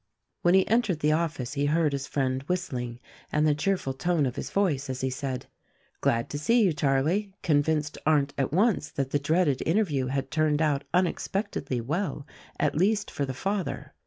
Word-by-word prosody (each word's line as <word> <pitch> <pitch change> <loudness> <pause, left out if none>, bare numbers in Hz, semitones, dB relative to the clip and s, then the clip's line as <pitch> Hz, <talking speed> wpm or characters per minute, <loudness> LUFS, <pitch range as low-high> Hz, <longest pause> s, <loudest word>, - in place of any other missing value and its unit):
When 175 +1 +4
he 190 - +4
entered 215 -8 +1
the 150 - +3
office 155 -6 -1
he 145 0 0
heard 155 0 +2
his 140 0 -3
friend 130 -2 -1
whistling, 125 -10 -3 0.3
and 150 +1 +2
the 150 - +4
cheerful 155 -3 -1
tone 165 +2 +1
of 125 - -2
his - - -4
voice 150 -9 0
as 130 -1 -3
he 130 0 0
said, 130 -1 -4 0.5
"Glad 115 0 +1
to 145 - -3
see 230 +9 +3
you, 185 -5 +3
Charlie," 155 +8 +1
convinced 150 -1 +1
Arndt 145 -2 +2
at 135 -1 -1
once 190 -2 +2
that 135 -1 -3
the 145 - +2
dreaded 150 -1 +1
interview 160 -8 +1
had 135 +1 -2
turned 155 -1 +2
out 145 -3 +1
unexpectedly 175 - -1
well— 150 - -2 0.3
at - - +2
least 200 +6 +1
for 140 - -2
the 130 - -4
father. 195 +4 -3
150 Hz, 185 wpm, -27 LUFS, 135-180 Hz, 0.5 s, When